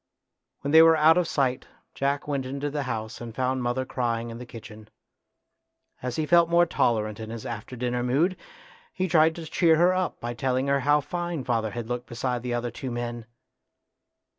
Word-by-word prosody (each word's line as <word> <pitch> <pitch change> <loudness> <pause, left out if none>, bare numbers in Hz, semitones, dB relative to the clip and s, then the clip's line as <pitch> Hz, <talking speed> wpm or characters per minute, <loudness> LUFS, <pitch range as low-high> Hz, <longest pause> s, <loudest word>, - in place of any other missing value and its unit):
When 140 - -2
they 160 +1 +9
were 165 0 +7
out 160 +3 +6
of 175 - 0
sight 130 -3 0 0.3
Jack 140 +1 -1
went 140 -3 -2
into 140 +2 -3
the 145 0 -2
house 110 -1 -4
and 115 -2 -8
found 130 0 0
mother 125 +2 -1
crying 120 -2 -2
in 115 - -8
the 125 - -9
kitchen. 110 -2 -11 1.1
As 125 -1 -3
he 155 - -1
felt 170 +1 +4
more 170 +1 +5
tolerant 110 -9 0
in 110 0 -6
his 115 -1 -7
after 120 +2 -6
dinner 125 0 -2
mood, 145 +10 +1 0.6
he 185 - -2
tried 160 -1 +4
to 165 - -7
cheer 165 0 +3
her 175 +3 +4
up 185 -1 -2
by 120 +1 -4
telling 130 +2 0
her 140 0 +2
how 145 +2 +3
fine 175 0 -4
father 115 -4 0
had 115 +1 -6
looked 120 0 -4
beside 125 +1 -2
the 120 0 -2
other 120 0 -2
two 130 +3 -6
men. 120 -1 -5
130 Hz, 195 wpm, -26 LUFS, 120-155 Hz, 1.1 s, they